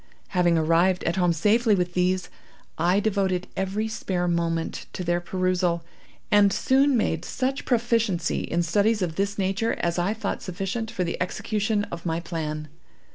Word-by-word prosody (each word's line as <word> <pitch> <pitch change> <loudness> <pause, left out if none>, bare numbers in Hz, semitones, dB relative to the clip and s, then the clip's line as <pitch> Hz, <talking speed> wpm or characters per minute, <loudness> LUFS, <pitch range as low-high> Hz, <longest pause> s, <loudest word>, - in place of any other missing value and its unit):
Having 175 -3 +3
arrived 170 +3 +3
at 170 +3 -1
home 180 -2 +3
safely 210 +7 +3
with 180 -1 -1
these, 185 +1 +1 0.5
I 175 +4 +2
devoted 195 -3 0
every 195 +3 -1
spare 185 -5 -2
moment 165 -1 -1
to 185 - -4
their 175 0 0
perusal, 180 -1 0 0.5
and 205 -1 +6
soon 270 +3 +3
made 165 -6 0
such 265 +8 -2
proficiency 230 -8 +1
in 170 +1 -1
studies 205 +5 +2
of 165 -3 -3
this 200 +1 -1
nature 195 +4 0
as 170 0 -1
I 195 +5 0
thought 220 -2 -3
sufficient 195 +5 -3
for 185 - -2
the 170 - -3
execution 210 +3 -1
of 170 0 -6
my 165 0 0
plan. 155 -3 -4
185 Hz, 160 wpm, -25 LUFS, 170-210 Hz, 0.5 s, and